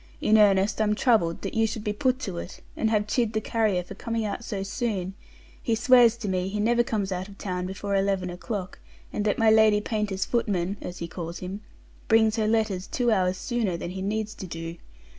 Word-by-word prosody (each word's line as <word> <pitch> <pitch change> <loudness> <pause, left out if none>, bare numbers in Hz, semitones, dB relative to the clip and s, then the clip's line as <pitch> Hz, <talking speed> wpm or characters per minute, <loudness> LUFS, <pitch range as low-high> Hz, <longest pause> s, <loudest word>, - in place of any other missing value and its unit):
In 215 - +3
earnest, 200 0 +4
I'm 210 -1 +2
troubled 210 -9 +2
that - - -4
you 225 0 +2
should 220 -1 -5
be 210 - -1
put 255 +4 +1
to 180 -7 -4
it, 175 - -8 0.2
and 220 - +1
have 210 -2 +2
chid 230 +1 0
the 220 - +1
carrier 215 -5 0
for 180 - -9
coming 230 -1 -3
out 210 +3 -4
so 200 -4 -3
soon; 195 -2 -2 0.5
he 230 - +1
swears 240 -1 +5
to 230 -3 -5
me 185 -1 0
he 210 +2 -3
never 235 +3 +3
comes 210 -4 -1
out 185 +1 -3
of 200 -1 -13
town 180 -2 -3
before 200 +1 -3
eleven 195 -2 0
o'clock, 185 +1 -5 0.3
and 205 - -1
that 205 - +1
my 225 -1 +5
Lady 220 -1 +5
Paynter's 210 -3 -2
footman 200 -5 -1
(as 180 - -6
he 170 - -5
calls 170 0 -6
him) 190 +3 -6 0.5
brings 220 -1 +4
her 215 -1 +1
letters 215 -4 0
two 245 -2 +1
hours 185 -3 +2
sooner 225 -6 -1
than 175 - -5
he 190 +1 -5
needs 215 +2 -2
to 190 - -8
do. 165 0 -6
210 Hz, 215 wpm, -26 LUFS, 185-220 Hz, 0.5 s, swears